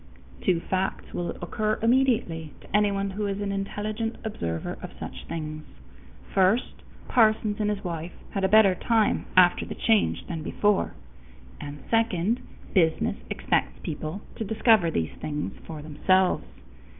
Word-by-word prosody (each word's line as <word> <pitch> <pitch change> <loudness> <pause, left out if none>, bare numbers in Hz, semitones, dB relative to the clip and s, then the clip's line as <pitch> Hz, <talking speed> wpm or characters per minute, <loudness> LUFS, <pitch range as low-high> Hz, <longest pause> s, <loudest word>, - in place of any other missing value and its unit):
Two 180 -3 +3
facts 190 +1 -2
will 175 -1 -2
occur 215 +5 0
immediately 230 - +2
to - - -6
anyone 200 -1 +2
who 205 +2 -2
is 200 0 -2
an 200 -1 -2
intelligent 210 +3 -3
observer 85 - -3
of - - -6
such - - -7
things: 155 -2 -5 0.7
first, 195 +5 +2 0.3
Parsons 215 -3 +3
and 210 -1 +1
his 205 0 -2
wife 170 -1 -4 0.2
had 195 - -2
a 190 - +3
better 210 -2 +7
time 220 +3 +1
after 180 -1 +6
the - - -6
change 220 -3 +2
than 165 -3 -4
before; 205 +5 +1 0.6
and 145 0 -8
second, 225 -1 +2 0.3
business 165 -5 +2
expects - - 0
people 155 +6 -4
to - - -2
discover 220 -3 +4
these 80 - -1
things 150 -9 -3
for 155 -2 -7
themselves. 185 +5 +2
195 Hz, 140 wpm, -26 LUFS, 165-215 Hz, 0.7 s, better